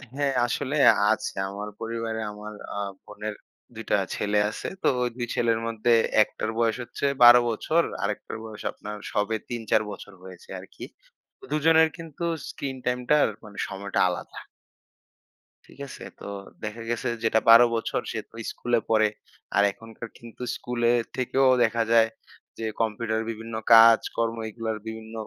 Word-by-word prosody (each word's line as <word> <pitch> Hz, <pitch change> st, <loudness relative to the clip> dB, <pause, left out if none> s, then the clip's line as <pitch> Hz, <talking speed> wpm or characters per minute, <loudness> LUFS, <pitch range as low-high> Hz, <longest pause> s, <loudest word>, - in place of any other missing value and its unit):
হ্যাঁ 140 Hz, -1 st, 0 dB
আসলে 140 Hz, +4 st, -2 dB, 0.4 s
আছে। -, -, -1 dB, 0.2 s
আমার 105 Hz, +1 st, -6 dB
পরিবারে 115 Hz, 0 st, -3 dB
আমার 105 Hz, +1 st, -9 dB, 0.2 s
আ -, -, -4 dB, 0.3 s
বোনের 105 Hz, 0 st, -6 dB, 0.4 s
২ 110 Hz, -, -6 dB
টা -, -, +5 dB, 0.2 s
ছেলে 105 Hz, 0 st, +1 dB
আছে। -, -, -6 dB, 0.2 s
তো -, -, +3 dB, 0.3 s
ওই 120 Hz, -1 st, -3 dB
ছেলের 115 Hz, -1 st, +2 dB
মধ্যে 115 Hz, +1 st, 0 dB, 0.3 s
১ -, -, +4 dB
টার 110 Hz, -, -2 dB
বয়স 115 Hz, -1 st, +2 dB
হচ্ছে 140 Hz, -, -5 dB, 0.2 s
১২ 120 Hz, 0 st, +10 dB
বছর, 160 Hz, +9 st, +1 dB, 0.2 s
আরেকটার 105 Hz, +2 st, -3 dB
বয়স 110 Hz, -1 st, -9 dB
আপনার 105 Hz, +1 st, -8 dB, 0.2 s
সবে 105 Hz, +2 st, 0 dB
৩-৪ 115 Hz, -3 st, +1 dB
বছর 100 Hz, -, -10 dB
হয়েছে 95 Hz, -2 st, -13 dB
আরকি। -, -, -12 dB, 0.6 s
তো -, -, -15 dB
দুজনের 160 Hz, +1 st, +5 dB
কিন্তু 165 Hz, 0 st, -7 dB, 0.2 s
স্ক্রিন 135 Hz, -2 st, -5 dB
টাইম 125 Hz, 0 st, +1 dB
টার 150 Hz, -1 st, +5 dB, 0.2 s
মানে 105 Hz, -1 st, -12 dB
সময়টা 100 Hz, 0 st, -3 dB
আলাদা। 90 Hz, -, -6 dB, 1.3 s
ঠিক -, -, -19 dB
আছে? -, -, -10 dB, 0.2 s
তো -, -, -10 dB, 0.4 s
দেখা 110 Hz, +2 st, -5 dB
গেছে 120 Hz, +1 st, -2 dB, 0.2 s
যেটা 110 Hz, 0 st, +3 dB
১২ 115 Hz, +1 st, +10 dB
বছর 115 Hz, -, -1 dB
সে -, -, -3 dB
তো -, -, -17 dB, 0.2 s
স্কুলে 120 Hz, -1 st, 0 dB
পড়ে। 110 Hz, -1 st, +4 dB, 0.5 s
আর 100 Hz, -, +5 dB
এখনকার 115 Hz, +2 st, -10 dB
কিন্তু 120 Hz, +1 st, -10 dB
স্কুলে 120 Hz, -1 st, 0 dB, 0.2 s
থেকেও 130 Hz, +1 st, +2 dB, 0.2 s
দেখা 115 Hz, 0 st, +1 dB
যায় 115 Hz, -1 st, +5 dB, 0.5 s
যে 115 Hz, -, -4 dB, 0.2 s
কম্পিউটারের 110 Hz, 0 st, -1 dB
বিভিন্ন 115 Hz, 0 st, -7 dB, 0.2 s
কাজ 115 Hz, 0 st, +9 dB, 0.2 s
কর্ম 115 Hz, 0 st, 0 dB
এগুলোর 110 Hz, 0 st, -4 dB
বিভিন্ন 110 Hz, 0 st, -7 dB
115 Hz, 155 wpm, -26 LUFS, 110-120 Hz, 1.3 s, ১২